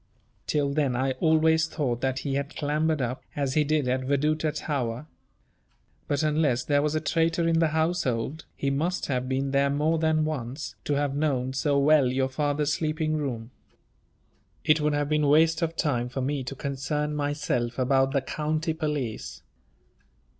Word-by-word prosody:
Till 140 -2 +1
then 140 -4 +1
I 130 +2 +1
always 160 -1 +3
thought 130 -7 -2
that 135 0 0
he 140 - -1
had 140 +1 -3
clambered 150 0 0
up, 125 +1 -3
as 140 -2 -1
he 150 - +3
did 150 -2 +1
at 130 +1 +1
Veduta 150 +3 +1
tower. 130 -4 -3 1.0
But 145 +1 0
unless 150 -5 +1
there 145 -1 +2
was 150 +1 0
a - - +2
traitor 165 +1 +1
in 165 0 +3
the 165 - +4
household, 155 -4 -1
he 140 - -1
must 165 +6 -1
have 130 -2 -2
been 135 +1 -1
there 140 0 +3
more 150 +3 +1
than 160 -1 +2
once, 140 -1 -4
to 145 - 0
have 140 -1 0
known 135 -4 0
so 140 +1 +1
well 140 -1 +5
your 130 0 0
father's 145 +1 0
sleeping 155 0 -1
room. 125 -6 -3 1.1
It 150 0 +3
would 150 0 +1
have 145 0 0
been 150 0 +2
waste 160 +4 +4
of 165 0 -1
time 125 -8 0
for 135 +1 -4
me 135 +1 -1
to 135 - -5
concern 145 +2 -2
myself 145 -5 -1
about 135 +1 +2
the 140 -1 +1
county 155 +4 -2
police. 150 -8 -4
145 Hz, 170 wpm, -26 LUFS, 135-155 Hz, 1.1 s, well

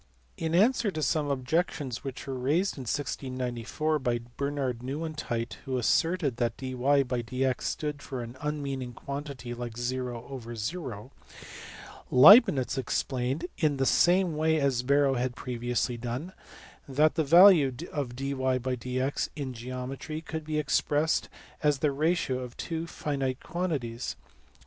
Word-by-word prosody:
In 165 0 -1
answer 225 +3 +4
to 155 -5 -3
some 150 +1 +1
objections 140 -1 -1
which 135 -3 -6
were 135 - -4
raised 145 +10 +1
in 130 - -7
1694 130 +3 -2
by 120 -3 0 0.2
Bernard 140 -4 -2
Nieuwentyt 135 -4 -4
who 130 -2 -1
asserted 150 +2 +1
that 120 -2 -1
dyjdx 130 -1 0
stood 150 -1 -3
for 130 -4 -5
an 120 +1 -9
unmeaning 140 -4 -3
quantity 140 -2 -6
like 120 -1 -5
0/0, 120 - -4 1.0
Leibnitz 145 - +7
explained, 130 +4 -1
in 150 -4 +2
the 135 - +1
same 175 +2 +4
way 160 +1 +2
as 135 -4 +1
Barrow 140 +1 +3
had 125 -1 -1
previously 120 -1 -2
done, 125 +10 -5 0.6
that 150 +3 +3
the 160 +1 +1
value 170 -2 +7 0.2
of 135 -5 -3
dyjdx 130 -1 -1
in 135 -4 -4
geometry 130 +5 -5
could 160 -1 -6
be 155 0 -2
expressed 150 +2 +1 0.3
as 150 -2 +3
the 145 +1 +1
ratio 155 -2 0
of 125 -1 -8
two 165 -1 -4
finite 135 -5 -2
quantities. 140 -10 -3
135 Hz, 125 wpm, -28 LUFS, 125-150 Hz, 1.0 s, Leibnitz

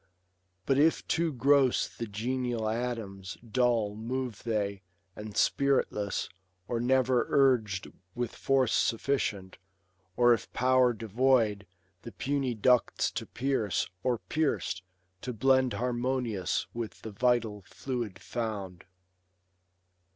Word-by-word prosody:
But 135 0 +2
if 160 +2 +3
too 165 0 +1
gross 135 0 +3
the 115 - -7
genial 120 +1 -2
atoms, 110 -5 -4
dull 115 -3 +1
Move 120 +1 -4
they, 100 -4 -2 0.3
and 105 -1 -8
spirifless, 135 -7 +1 0.4
or 120 - -1
never 130 0 +2
urg'd 115 -9 +3 0.3
With 120 -1 -3
force 135 -3 +2
sufficient, 110 -7 0 0.6
or 120 0 +6
of 115 - -3
power 130 0 +4
devoid 110 -2 +1 0.3
The 115 - -9
puny 135 -3 -1
ducts 125 +3 +2
to - - -5
pierce, 120 -9 -1
or, 125 -2 +1
pierc'd, 150 -10 -1 0.4
to 125 - -4
blend 130 +2 +3
Harmonious 120 -6 -1
with 115 -5 -6
the 110 - -6
vital 110 -1 +1
fluid 115 +2 -4
found. 100 -6 -5
120 Hz, 110 wpm, -29 LUFS, 105-130 Hz, 0.6 s, or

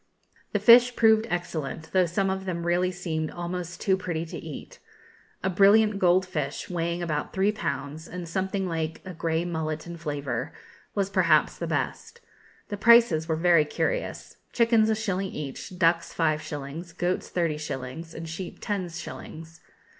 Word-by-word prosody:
The - - +1
fish 245 +1 +7
proved 220 0 +4
excellent, 160 -2 -4
though 185 -2 +3
some 190 +3 0
of 190 0 -4
them 170 -2 -3
really 175 +1 +2
seemed 160 -3 -3
almost 175 0 -5
too 190 - +2
pretty 175 -3 -3
to 160 - -7
eat. 155 -4 -9 0.6
A 190 - +1
brilliant 205 +2 +5
gold 185 0 +4
fish, 150 -3 -4
weighing 170 0 -1
about 150 -3 -2
three 195 +2 +2
pounds, 155 -5 -4
and 180 -1 -6
something 190 +2 -1
like 160 -2 -3
a 185 - -6
grey 165 0 -1
mullet 160 -2 -3
in 170 0 -7
flavour, 145 -4 -3 0.4
was 200 -1 0
perhaps 170 -5 +3
the - - -4
best. 470 - -3 0.5
The 205 - -3
prices 225 -8 +5
were 160 - +1
very 170 -1 +5
curious. - - -3 0.2
Chickens 230 -2 +4
a 220 - +3
shilling 195 -3 -1
each, 150 +4 -7
ducks 170 -1 +2
five 155 -2 +1
shillings, 150 +3 -7
goats 180 +1 -1
thirty 165 -4 0
shillings, 150 +2 -6
and 165 0 -6
sheep 170 +2 -6
ten 195 -4 -2
shillings. 165 -1 -9
175 Hz, 160 wpm, -26 LUFS, 160-190 Hz, 0.6 s, fish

